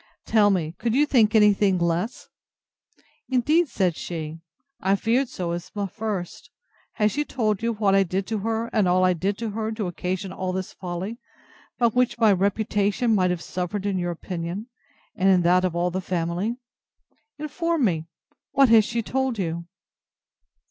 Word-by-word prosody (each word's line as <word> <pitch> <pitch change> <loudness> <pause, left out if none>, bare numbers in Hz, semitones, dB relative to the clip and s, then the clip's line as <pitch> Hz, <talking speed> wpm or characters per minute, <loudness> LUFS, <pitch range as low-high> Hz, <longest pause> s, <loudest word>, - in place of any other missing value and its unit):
Tell 210 -2 +4
me, 170 -5 0
could 235 -1 0
you 290 +2 +4
think 230 -6 +3
any 210 -1 +6
thing 195 -2 +2
less? 170 +6 -1 1.0
Indeed, 300 +7 +3
said 185 - 0
she, 160 -2 -5 0.4
I 195 +1 +2
feared 235 +5 +1
so 170 -2 -3
at 175 0 -5 0.2
first. 210 -6 -5 0.4
Has 210 -1 +2
she 295 - -1
told 215 -8 -1
you 230 0 0
what 205 -2 +1
I 195 - +5
did 190 +1 -1
to 220 0 -2
her, 225 +2 -1
and 210 -4 +3
all 185 +1 +3
I 185 - +4
did 195 +4 -1
to 230 -2 -3
her, 220 +1 -3
to 215 -2 -3
occasion 185 +2 -3
all 185 -1 -3
this 185 0 -4
folly, 185 +5 -5 0.6
by 235 -2 +4
which 250 +2 +1
my 225 -3 +5
reputation 205 +3 +1
might 185 -3 +3
have 180 -1 -2
suffered 185 +3 -4
in 195 -2 0
your 175 0 -1
opinion, 175 +5 -5 0.5
and 190 +1 +2
in 185 -2 +4
that 180 +2 +4
of 180 -2 0
all 175 +1 0
the 185 +2 -2
family.—Inform 245 - -4
me, 165 -5 -1 0.5
what 275 -2 +5
she 230 - +7 0.2
has 230 - +1
told 265 -2 -1
you? 170 -3 -3
200 Hz, 170 wpm, -24 LUFS, 180-230 Hz, 1.0 s, she